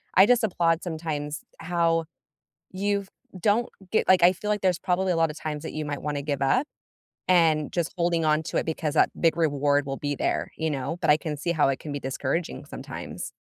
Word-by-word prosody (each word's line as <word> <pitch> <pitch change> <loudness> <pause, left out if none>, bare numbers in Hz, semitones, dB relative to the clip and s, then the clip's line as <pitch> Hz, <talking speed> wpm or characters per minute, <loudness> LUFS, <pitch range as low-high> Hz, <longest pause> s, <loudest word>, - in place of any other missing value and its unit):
I 190 - +8
just 240 +1 +3
applaud 170 -4 +2
sometimes 155 -3 -4 0.2
how 165 -1 +1 0.7
you 200 +1 0 0.4
don't 220 +4 +2 0.2
get - - +2
like, 185 -1 +6
I 175 +1 +7
feel 210 +3 -5
like 210 -1 +1
there's 180 -3 +2
probably 185 0 0
a - - 0
lot 165 -1 +2
of 150 - -8
times 150 -1 -4
that 160 - -6
you 155 0 -3
might 145 -1 -4
wanna 145 -1 -2
give 140 -2 -2
up 255 - +2 0.6
and 160 -4 +3
just 170 -2 -1
holding 170 -1 +1
on 155 0 +3
to - - -4
it - - 0
because 160 -2 -2
that - - +4
big 165 -1 +3
reward 145 -3 +2
will 135 0 -3
be 145 0 -2
there, - - -1
you 160 -1 -1
know? 140 +4 -3
But - - +2
I 150 - +7
can 155 -2 -4
see 155 +4 -2
how 155 -4 +3
it 135 - 0
can 150 - -7
be 145 - -2
discouraging 135 +5 -3
sometimes. - - -7
160 Hz, 220 wpm, -26 LUFS, 150-180 Hz, 0.7 s, I